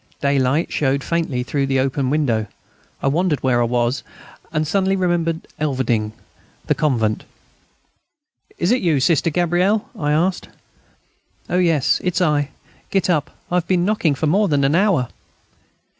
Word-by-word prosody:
Daylight 140 Hz, +2 st, +1 dB
showed 140 Hz, -1 st, 0 dB
faintly 160 Hz, -7 st, -1 dB
through 135 Hz, +1 st, -1 dB
the 135 Hz, -1 st, +1 dB
only 135 Hz, +1 st, 0 dB
window. 130 Hz, -6 st, 0 dB, 0.6 s
I -, -, +1 dB
wondered 160 Hz, +1 st, +1 dB
where 125 Hz, -2 st, +2 dB
I -, -, +3 dB
was, 120 Hz, +2 st, 0 dB, 0.5 s
and 155 Hz, -1 st, -1 dB
suddenly 195 Hz, +3 st, +1 dB
remembered... 175 Hz, -3 st, -1 dB
Elverdinghe... 120 Hz, -7 st, 0 dB, 0.5 s
the -, -, +2 dB
convent.... 115 Hz, -8 st, 0 dB, 1.3 s
"Is 175 Hz, +5 st, +1 dB
it 250 Hz, -, +2 dB
you, 160 Hz, -6 st, +2 dB
Sister 165 Hz, +3 st, +2 dB
Gabrielle?" 180 Hz, +6 st, +1 dB
I 150 Hz, -8 st, -1 dB
asked. 175 Hz, +5 st, 0 dB, 1.0 s
"Oh, 180 Hz, -, +2 dB
yes, 165 Hz, -6 st, +2 dB
it's 180 Hz, 0 st, 0 dB
I. 150 Hz, -5 st, +1 dB, 0.4 s
Get 195 Hz, -2 st, +1 dB
up. 150 Hz, -4 st, 0 dB, 0.2 s
I 180 Hz, -, +2 dB
have 175 Hz, -, -1 dB
been 180 Hz, -2 st, +2 dB
knocking 185 Hz, -8 st, +1 dB
for 155 Hz, -, -2 dB
more 200 Hz, +7 st, +3 dB
than 145 Hz, -4 st, +1 dB
an 135 Hz, +2 st, +2 dB
hour." 170 Hz, -, +2 dB
155 Hz, 150 wpm, -20 LUFS, 135-175 Hz, 1.3 s, I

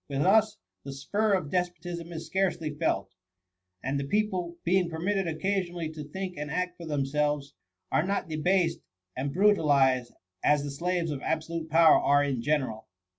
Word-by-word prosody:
With 140 Hz, 0 st, 0 dB
us, 215 Hz, +2 st, +4 dB, 0.3 s
the 140 Hz, -, -6 dB
spur 205 Hz, +10 st, 0 dB
of 170 Hz, -6 st, -3 dB
despotism 175 Hz, -1 st, -3 dB
is 165 Hz, -1 st, -6 dB
scarcely 175 Hz, -5 st, -1 dB
felt; 150 Hz, -10 st, -1 dB, 0.7 s
and 135 Hz, +2 st, -1 dB
the -, -, -2 dB
peo 210 Hz, +9 st, +1 dB
ple, 175 Hz, -2 st, -4 dB
being 180 Hz, 0 st, +2 dB
permitted 180 Hz, +3 st, -1 dB
occasionally 175 Hz, 0 st, -2 dB
to 155 Hz, -1 st, -7 dB
think 185 Hz, +4 st, -6 dB
and 150 Hz, 0 st, -4 dB
act 180 Hz, +2 st, -2 dB
fOT 170 Hz, -, -7 dB
themselves, 145 Hz, 0 st, -1 dB, 0.4 s
are -, -, +3 dB
not 195 Hz, +2 st, -1 dB
debased 165 Hz, +2 st, +1 dB, 0.4 s
and 140 Hz, +2 st, -2 dB
bru 205 Hz, +6 st, +5 dB
talized 135 Hz, -7 st, +2 dB, 0.3 s
as 150 Hz, -1 st, +3 dB
the 145 Hz, -, -4 dB
slaves 170 Hz, +3 st, -1 dB
of 140 Hz, -2 st, -4 dB
absolute 160 Hz, 0 st, -3 dB
power 160 Hz, 0 st, +6 dB
are 145 Hz, 0 st, +4 dB
in 135 Hz, -4 st, -1 dB
general. 130 Hz, -6 st, -1 dB
160 Hz, 170 wpm, -28 LUFS, 145-180 Hz, 0.7 s, power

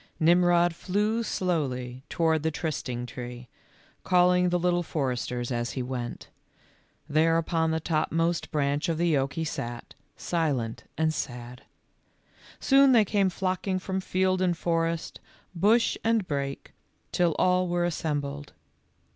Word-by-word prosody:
Nirnrod 175 Hz, +1 st, +4 dB
flew 210 Hz, +6 st, 0 dB
slowly 130 Hz, -, -2 dB
toward 160 Hz, -2 st, +1 dB
the 160 Hz, -, +1 dB
trysting 140 Hz, -6 st, -3 dB
tree, 120 Hz, 0 st, -8 dB, 0.5 s
calling 180 Hz, 0 st, +4 dB
the 180 Hz, -, +2 dB
Little 175 Hz, 0 st, +1 dB
Foresters 125 Hz, -6 st, -2 dB
as 120 Hz, -1 st, -2 dB
he 130 Hz, -, -3 dB
went. 125 Hz, -1 st, -5 dB, 0.8 s
There 160 Hz, +2 st, +3 dB
upon 165 Hz, 0 st, 0 dB
the 160 Hz, 0 st, 0 dB
topmost 165 Hz, +1 st, 0 dB
branch 145 Hz, +1 st, 0 dB
of 165 Hz, -, 0 dB
the 170 Hz, -2 st, +2 dB
oak 135 Hz, 0 st, 0 dB
he 165 Hz, -, -2 dB
sat, 120 Hz, -5 st, -5 dB, 0.2 s
silent 140 Hz, -10 st, -2 dB
and 160 Hz, 0 st, +1 dB
sad. 125 Hz, -2 st, -6 dB, 0.9 s
Soon 275 Hz, -1 st, +5 dB
they 225 Hz, -3 st, +5 dB
came 200 Hz, -1 st, +2 dB
flocking 185 Hz, +1 st, -1 dB
from 190 Hz, 0 st, -3 dB
field 185 Hz, 0 st, 0 dB
and 175 Hz, -2 st, +1 dB
forest, 165 Hz, 0 st, -1 dB, 0.3 s
bush 215 Hz, +7 st, +3 dB
and 225 Hz, -4 st, +1 dB
brake, 140 Hz, -1 st, -4 dB, 0.4 s
till 175 Hz, -3 st, +2 dB
all 185 Hz, 0 st, +3 dB
were 175 Hz, 0 st, 0 dB
assembled. 145 Hz, -4 st, -3 dB
165 Hz, 130 wpm, -27 LUFS, 140-180 Hz, 0.9 s, Soon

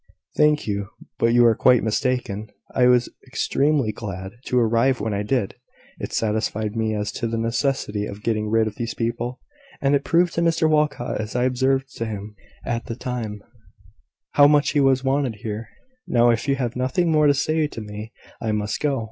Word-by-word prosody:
"Thank 150 Hz, 0 st, +3 dB
you: 100 Hz, -1 st, -2 dB, 0.3 s
but 115 Hz, -, +3 dB
you 120 Hz, 0 st, +5 dB
are 115 Hz, -, +6 dB
quite 125 Hz, +2 st, +4 dB
mistaken. 110 Hz, -3 st, -1 dB, 0.2 s
I 125 Hz, -1 st, +4 dB
was 125 Hz, -1 st, +4 dB, 0.2 s
extremely 140 Hz, -1 st, +1 dB
glad 95 Hz, -3 st, -6 dB
to 125 Hz, -, 0 dB
arrive 120 Hz, +2 st, +3 dB
when 105 Hz, +1 st, -2 dB
I 100 Hz, -, -1 dB
did. 105 Hz, -1 st, -1 dB, 0.5 s
It -, -, -5 dB
satisfied 110 Hz, 0 st, -1 dB
me 110 Hz, -1 st, 0 dB
as 105 Hz, 0 st, -2 dB
to 115 Hz, -, -3 dB
the 115 Hz, 0 st, -2 dB
necessity 115 Hz, -3 st, -1 dB
of 100 Hz, +1 st, -9 dB
getting 110 Hz, -2 st, 0 dB
rid 110 Hz, 0 st, +3 dB
of 110 Hz, -1 st, -5 dB
these 115 Hz, -1 st, -3 dB
people; 120 Hz, +2 st, -3 dB, 0.4 s
and 140 Hz, 0 st, +2 dB
it 140 Hz, 0 st, +2 dB
proved 170 Hz, 0 st, +2 dB
to 170 Hz, -, 0 dB
Mr 165 Hz, -1 st, +2 dB
Walcot, 150 Hz, -7 st, 0 dB
as 105 Hz, +2 st, -6 dB
I 125 Hz, -, +2 dB
observed 130 Hz, +1 st, +1 dB
to 115 Hz, -, -2 dB
him 105 Hz, 0 st, -6 dB, 0.3 s
at 115 Hz, -1 st, -3 dB
the 115 Hz, -, -4 dB
time, 115 Hz, -5 st, -5 dB, 0.9 s
how 145 Hz, 0 st, +7 dB
much 145 Hz, -1 st, +3 dB
he 150 Hz, -, +2 dB
was 135 Hz, -1 st, +3 dB
wanted 135 Hz, -3 st, 0 dB
here. 105 Hz, +1 st, -6 dB, 0.4 s
Now, 120 Hz, 0 st, +4 dB
if 115 Hz, +3 st, -1 dB
you 140 Hz, -, +3 dB
have 125 Hz, -3 st, -3 dB
nothing 130 Hz, +7 st, +1 dB
more 150 Hz, -1 st, +4 dB
to 145 Hz, -, +4 dB
say 155 Hz, +2 st, +1 dB
to 130 Hz, -, -8 dB
me, 105 Hz, +1 st, -7 dB, 0.3 s
I 110 Hz, -2 st, -1 dB
must 105 Hz, 0 st, -2 dB
go. 145 Hz, -4 st, 0 dB
120 Hz, 195 wpm, -23 LUFS, 110-135 Hz, 0.9 s, how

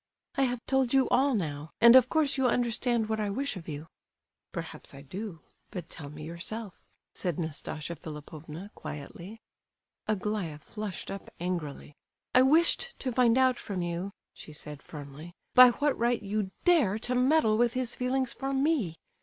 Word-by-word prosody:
"I 270 Hz, -, +2 dB
have 245 Hz, -1 st, -3 dB
told 265 Hz, -1 st, +2 dB
you 265 Hz, -1 st, +5 dB
all 275 Hz, -1 st, +3 dB
now, 150 Hz, -5 st, -3 dB
and 235 Hz, +1 st, +9 dB
of 255 Hz, -1 st, +7 dB
course 310 Hz, -3 st, +2 dB
you 265 Hz, -2 st, +2 dB
understand 240 Hz, -1 st, +1 dB
what 220 Hz, 0 st, -1 dB
I 210 Hz, -1 st, 0 dB
wish 270 Hz, +5 st, -2 dB
of 175 Hz, -3 st, -9 dB
you." 150 Hz, 0 st, -5 dB, 0.7 s
"Perhaps -, -, -7 dB
I 140 Hz, -, -10 dB
do; 185 Hz, +3 st, -7 dB, 0.3 s
but 175 Hz, -3 st, -7 dB
tell 145 Hz, -3 st, -8 dB
me 150 Hz, +1 st, -9 dB
yourself," 180 Hz, +5 st, -6 dB, 0.3 s
said 175 Hz, -4 st, -2 dB
Nastasia 160 Hz, 0 st, -4 dB
Philipovna, 155 Hz, +4 st, -9 dB
quietly. 170 Hz, +8 st, -8 dB, 0.7 s
Aglaya 210 Hz, -6 st, -1 dB
flushed 210 Hz, +4 st, -6 dB
up 195 Hz, -, -7 dB
angrily. 170 Hz, -5 st, -4 dB, 0.4 s
"I 255 Hz, -, +7 dB
wished 335 Hz, -, +4 dB
to 260 Hz, -, -2 dB
find 240 Hz, 0 st, +4 dB
out 260 Hz, -1 st, +4 dB
from 190 Hz, -4 st, -3 dB
you," 175 Hz, +3 st, -3 dB, 0.2 s
she 155 Hz, -, -11 dB
said, 150 Hz, -1 st, -8 dB
firmly, 150 Hz, +3 st, -10 dB, 0.2 s
"by 250 Hz, 0 st, +10 dB
what 285 Hz, +4 st, +1 dB
right 235 Hz, -1 st, +1 dB
you 205 Hz, -1 st, -1 dB
dare 290 Hz, -, +4 dB
to 245 Hz, +3 st, -2 dB
meddle 250 Hz, -2 st, +4 dB
with 235 Hz, +1 st, +3 dB
his 255 Hz, -2 st, -1 dB
feelings 255 Hz, 0 st, 0 dB
for 270 Hz, 0 st, -3 dB
me? 270 Hz, -, +1 dB
215 Hz, 165 wpm, -29 LUFS, 165-255 Hz, 0.7 s, by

